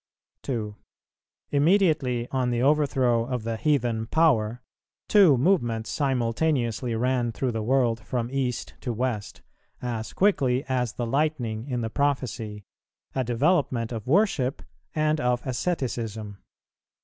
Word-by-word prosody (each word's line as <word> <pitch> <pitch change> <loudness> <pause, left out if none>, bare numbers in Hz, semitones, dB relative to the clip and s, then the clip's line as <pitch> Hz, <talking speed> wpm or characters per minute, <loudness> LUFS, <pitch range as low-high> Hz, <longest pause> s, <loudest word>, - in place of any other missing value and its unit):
2. 110 -5 -3 0.8
Immediately 145 -6 +2
on 130 -2 0
the 120 -1 0
overthrow 135 -5 +3
of 125 -3 -3
the 115 0 -2
heathen 120 -5 0
power, 125 -7 +2 0.4
two 190 -10 +6
movements 120 -8 +1
simultaneously 125 -3 0
ran 120 0 0
through 125 +2 -2
the 110 -1 -3
world 120 -1 +2
from 120 +1 -3
East 130 -3 -2
to 125 - -3
West, 115 -3 -3 0.4
as 115 -3 -4
quickly 135 -10 +2
as 125 -4 -1
the 120 - -3
lightning 125 -4 -1
in 125 -3 -2
the 110 - -2
prophecy, 125 -7 -2 0.5
a 130 - 0
development 125 -1 +1
of 115 -2 -5
worship 150 -6 +2 0.3
and 155 0 +1
of 125 -1 0
asceticism. 115 - -3
125 Hz, 125 wpm, -26 LUFS, 115-140 Hz, 0.8 s, two